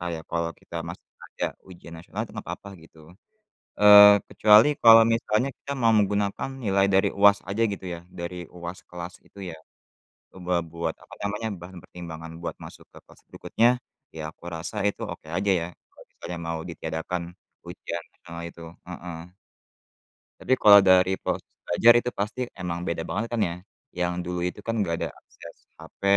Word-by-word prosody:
Kayak 85 Hz, -2 st, -4 dB
kalau 85 Hz, 0 st, -1 dB
kita -, -, -9 dB
masih -, -, -9 dB, 0.3 s
ada -, -, -1 dB, 0.2 s
ujian 85 Hz, -2 st, -12 dB
nasional 80 Hz, -, -7 dB
tu -, -, -15 dB
enggak -, -, -8 dB
apa-apa, 100 Hz, -, -7 dB
gitu. 80 Hz, -, -19 dB, 0.8 s
Eee, 105 Hz, 0 st, +9 dB
kecuali 105 Hz, +4 st, +6 dB
kalau 115 Hz, -1 st, +9 dB
misalnya 115 Hz, +2 st, +1 dB
kita 140 Hz, -, -6 dB
mau 115 Hz, -2 st, +4 dB
menggunakan 100 Hz, +2 st, 0 dB
nilai 100 Hz, -3 st, +2 dB
dari 95 Hz, +1 st, +4 dB
UAS 100 Hz, 0 st, +6 dB
aja 100 Hz, +4 st, -1 dB
gitu 100 Hz, -, -7 dB
ya, 85 Hz, -, -8 dB
dari 90 Hz, 0 st, -6 dB
UAS 85 Hz, +1 st, -7 dB
kelas 90 Hz, 0 st, -8 dB
itu 100 Hz, -, -15 dB
ya. 80 Hz, -, -9 dB, 0.8 s
Coba 90 Hz, -1 st, -1 dB
buat 85 Hz, +1 st, -4 dB
apa -, -, -17 dB
namanya, 105 Hz, +2 st, -2 dB
bahan 90 Hz, +2 st, -11 dB
pertimbangan 80 Hz, -2 st, -9 dB
buat -, -, -4 dB
masuk -, -, -12 dB
ke -, -, -16 dB
kelas -, -, -19 dB
berikutnya, 115 Hz, +2 st, +2 dB, 0.5 s
ya 80 Hz, -1 st, -5 dB
aku -, -, -28 dB
rasa, 85 Hz, +5 st, -6 dB
itu 100 Hz, -, -3 dB
oke -, -, -8 dB
aja 95 Hz, +4 st, +1 dB
ya, 85 Hz, -3 st, +1 dB, 0.2 s
kalau -, -, -18 dB
misalnya 90 Hz, -, -7 dB
mau 80 Hz, -1 st, -3 dB
ditiadakan 80 Hz, +2 st, -4 dB, 0.5 s
ujian -, -, -6 dB
nasional 85 Hz, 0 st, -10 dB
itu. 85 Hz, 0 st, -13 dB, 0.2 s
Heeh. 90 Hz, -1 st, -9 dB, 1.1 s
Tapi 130 Hz, -, -2 dB
kalau 100 Hz, -3 st, +8 dB
dari 95 Hz, -1 st, +5 dB
proses -, -, -3 dB, 0.2 s
belajar 115 Hz, +7 st, +6 dB
itu 125 Hz, -, -3 dB
pasti 105 Hz, +4 st, -3 dB, 0.2 s
emang 85 Hz, -1 st, -3 dB
beda 80 Hz, -1 st, -2 dB
banget 105 Hz, +7 st, -2 dB
kan 115 Hz, -, 0 dB
ya, 85 Hz, -3 st, 0 dB, 0.4 s
yang 90 Hz, 0 st, 0 dB
dulu 90 Hz, 0 st, -3 dB
itu 95 Hz, -, -9 dB
kan 115 Hz, -, -2 dB
enggak 85 Hz, -5 st, 0 dB
ada -, -, -1 dB
akses 85 Hz, -, -14 dB, 0.2 s
HP, -, -, -16 dB
90 Hz, 170 wpm, -25 LUFS, 85-105 Hz, 1.1 s, Eee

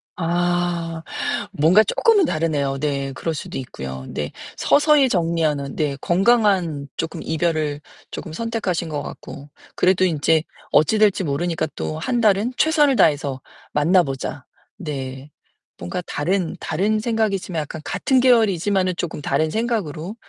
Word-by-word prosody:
아 175 Hz, -1 st, -1 dB, 0.5 s
뭔가 180 Hz, +6 st, +5 dB
조금은 420 Hz, -, +3 dB
다르네요. 150 Hz, -, -1 dB
네. 140 Hz, -2 st, -2 dB
그럴 165 Hz, +4 st, -3 dB
수도 150 Hz, -, -6 dB
있고요. 65 Hz, -, -7 dB
네. 75 Hz, -1 st, -4 dB, 0.3 s
서서히 295 Hz, -2 st, +4 dB
정리하는. 165 Hz, -6 st, 0 dB
네. 145 Hz, -3 st, -1 dB
건강한 185 Hz, -, +2 dB
조금 165 Hz, -, -4 dB
이별을 155 Hz, -3 st, -1 dB, 0.3 s
조금 160 Hz, -4 st, -7 dB
선택하신 200 Hz, -6 st, -2 dB
것 145 Hz, -2 st, -3 dB
같고. 145 Hz, +1 st, -9 dB, 0.3 s
그래도 185 Hz, 0 st, +3 dB
이제 160 Hz, -1 st, +2 dB, 0.3 s
어찌 185 Hz, +8 st, +4 dB
될지 205 Hz, -3 st, +3 dB
모르니까 160 Hz, +2 st, -1 dB
또 155 Hz, -, -4 dB
1 240 Hz, +6 st, -1 dB
달은 215 Hz, +3 st, +2 dB
최선을 300 Hz, -4 st, +3 dB
다해서 145 Hz, -, +2 dB, 0.3 s
만나보자. 145 Hz, -4 st, +1 dB, 0.3 s
네. 140 Hz, -5 st, -6 dB, 0.5 s
뭔가 90 Hz, -, -4 dB
다른 180 Hz, +3 st, -1 dB
다른 205 Hz, +7 st, 0 dB
생각이지만 210 Hz, -7 st, -1 dB
약간 150 Hz, +1 st, -7 dB
같은 265 Hz, -2 st, +1 dB
계열이지만은 200 Hz, -6 st, +3 dB
조금 165 Hz, -3 st, -4 dB
다른 155 Hz, +2 st, 0 dB
생각으로 210 Hz, -, -2 dB
170 Hz, 295 characters per minute, -21 LUFS, 150-205 Hz, 0.5 s, 뭔가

